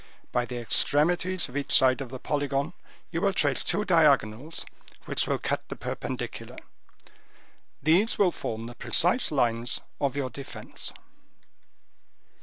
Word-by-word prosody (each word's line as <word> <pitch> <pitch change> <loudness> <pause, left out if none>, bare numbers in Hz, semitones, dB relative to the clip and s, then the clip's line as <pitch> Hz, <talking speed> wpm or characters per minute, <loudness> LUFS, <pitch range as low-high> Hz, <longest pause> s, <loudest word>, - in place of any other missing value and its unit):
By 125 0 +1
the 125 0 -6
extremities 170 +9 +2
of 125 - -13
each 145 -1 -2
side 130 -1 +5
of 130 - -5
the 130 - -6
polygon, 145 +3 -1 0.4
you 165 -1 -2
will 200 -1 +2
trace - - +2
two 210 - 0
diagonals, 150 - +2 0.4
which - - -1
will - - +1
cut - - -3
the - - -5
perpendicular. - - -5 1.3
These 175 - +3
will 190 -3 +4
form 110 -6 -5
the 120 - -8
precise 175 - +2
lines 120 -4 +1 0.2
of 140 -2 0
your 135 -3 -2
defense." 135 +3 -8
140 Hz, 135 wpm, -27 LUFS, 125-170 Hz, 1.3 s, side